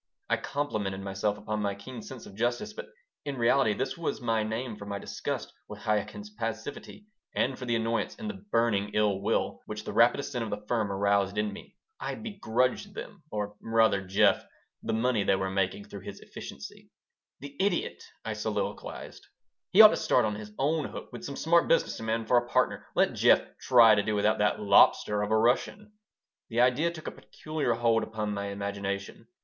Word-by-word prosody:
I - - +4
complimented 105 -10 -3
myself 100 +1 -1
upon 105 0 -3
my 100 -1 -1
keen 115 +4 -9
sense 130 +2 -9
of - - -12
justice, 120 - -1
but - - -7 0.4
in 140 -2 -4
reality 120 -1 +3
this 130 - -2
was 165 - -2
my 115 -3 0
name 110 +2 -3
for 100 -1 -10
my 100 0 -3
disgust - - -5
with 105 0 -9
Chaikin's 110 - -2
passivity 115 - -6 0.3
and 130 +1 +1
for 130 - -7
the 120 -1 +1
annoyance 115 0 -1
and 225 -3 -6
the 215 - -3 0.2
burning 105 -3 +2
ill 105 -2 +2
will - - 0
which 105 0 -5
the - - -6
rapid 120 +4 +5
ascent 125 -4 -3
of 110 - -4
the 105 - -5
firm 110 -4 0
aroused 100 0 +1
in 105 -1 0
me. - - -12 0.2
I - - -3
begrudged 130 - -1
them - - -8
or, 105 -1 -4
rather, 115 -3 +3
Jeff 95 +1 +3 0.4
the - - -3
money 115 -1 +1
they 95 - +3
were 95 0 -2
making 95 +1 -1
through 100 -1 -9
his 100 +1 -9
efficiency - - -10 0.5
"The 140 0 -9
idiot!" 205 - 0 0.2
I - - -2
soliloquized. - - -4 0.4
"He 195 - +8
ought 215 - +11
to - - -1
start 125 - +2
on 105 - -1
his 105 0 -8
own 150 +2 +1
hook - - -8
with 120 - -8
some 140 - -5
smart 170 +3 +3
business 165 - +1
man 115 0 -1
for 125 - +4
a 120 0 +1
partner. - - +1
Let - - +3
Jeff - - +5 0.2
try 120 -4 +7
to 105 - +3
do 105 +1 -1
without 105 +1 +2
that 105 0 +2
'lobster' 105 0 +4
of 105 - -1
a 110 - +3
Russian." 160 - +1 0.6
The 115 0 -1
idea 130 +7 +3
took 165 -2 -9
a - - -3
peculiar 155 -6 -3
hold 115 -1 +2
upon 105 -1 -3
my 100 0 -3
imagination. 100 +2 -4
110 Hz, 195 wpm, -29 LUFS, 105-130 Hz, 0.6 s, ought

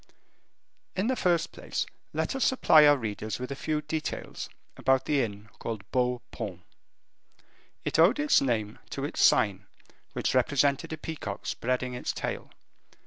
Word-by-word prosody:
In 190 +2 0
the 260 +2 +1
first 175 -7 +1
place, - - -3 0.3
let - - -1
us 270 - +1
supply 155 - +6
our 145 0 +6
readers 110 -2 -4
with 125 +2 -5
a - - -2
few 150 +2 -2
details 155 +1 -4 0.3
about 130 0 +2
the 145 -2 +2
inn 105 -2 -4
called 110 -4 -4
Beau 125 -1 +1
Paon. 95 -6 -6 1.2
It - - 0
owed 180 - +6
its 295 -1 +4
name 110 -6 -1
to - - -3
its - - -2
sign, 100 -2 +4 0.5
which - - 0
represented 140 +1 +2
a 160 - -3
peacock 145 -11 -6
spreading 125 +1 -1
its 125 - -3
tail. - - -4
130 Hz, 150 wpm, -28 LUFS, 110-155 Hz, 1.2 s, supply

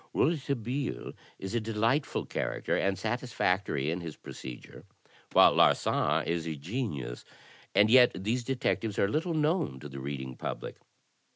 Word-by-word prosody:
Rouletabille 135 -4 -1 0.2
is 95 +2 -6
a 120 - +2
delightful 115 +6 0
character - - -2
and 95 0 +1
satisfactory 100 - 0
in 85 +2 -3
his 80 -3 -6
procedure, 65 -2 -10 0.5
while - - +7
Larsan - - +3
is 85 -1 -1
a 80 - -2
genius. 75 - -4 0.5
And 100 +2 +6
yet 125 +2 +7
these 110 +7 -1
detectives 115 -4 -1
are 100 - +3
little 160 - -1
known 155 - +1
to 75 - -8
the 70 -1 -8
reading 65 -2 -5
public. - - -5
105 Hz, 135 wpm, -30 LUFS, 75-125 Hz, 0.5 s, while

